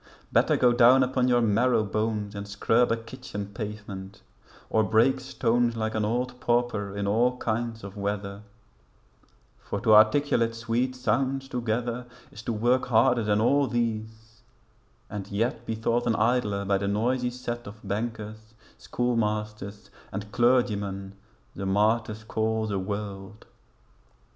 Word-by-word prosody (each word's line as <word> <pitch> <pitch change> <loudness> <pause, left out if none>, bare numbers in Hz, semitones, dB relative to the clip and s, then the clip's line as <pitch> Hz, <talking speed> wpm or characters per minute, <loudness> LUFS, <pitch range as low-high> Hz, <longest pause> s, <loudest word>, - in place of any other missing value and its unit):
Better - - +4
go 125 -1 +4
down 125 +2 +6
upon 125 0 +1
your 120 -1 +3
marrow 115 +1 +3
bones 105 0 -2
And 100 0 -6
scrub 115 +4 +2
a 115 - +2
kitchen 115 -4 -8
pavement, 100 -2 -7 0.4
or 110 - +2
break 110 +6 +3
stones 120 -2 0
Like 110 0 -1
an 110 - 0
old 125 +3 -2
pauper 120 -5 0
in 100 - -1
all 120 +5 +2
kinds 115 -1 -3
of 100 0 -8
weather; 100 0 -3 1.2
For 100 - -4
to 110 -3 +4
articulate 115 +1 +4
sweet 120 +3 -1
sounds 135 +1 0
together 120 0 -2 0.2
Is 110 - -10
to 115 - -3
work 120 +4 +1
harder 120 0 +3
than 105 0 +2
all 140 +5 +3
these 110 -2 -3 0.7
and 100 -2 -6
yet 115 +3 -2
Be 115 - -1
thought 115 +2 0
an 115 - +2
idler 105 -3 +1
by 100 0 +1
the 100 - -2
noisy 125 +5 0
set 120 -2 -6
Of 105 0 -11
bankers, 110 +1 -5 0.2
schoolmasters, 105 -4 -2 0.2
and 105 +1 -6
clergymen 105 -6 +1 0.4
The 95 - -4
martyrs 110 +2 +1
call 110 0 -1
the 100 -2 -2
world.' 100 +1 -6
110 Hz, 140 wpm, -27 LUFS, 105-120 Hz, 1.2 s, down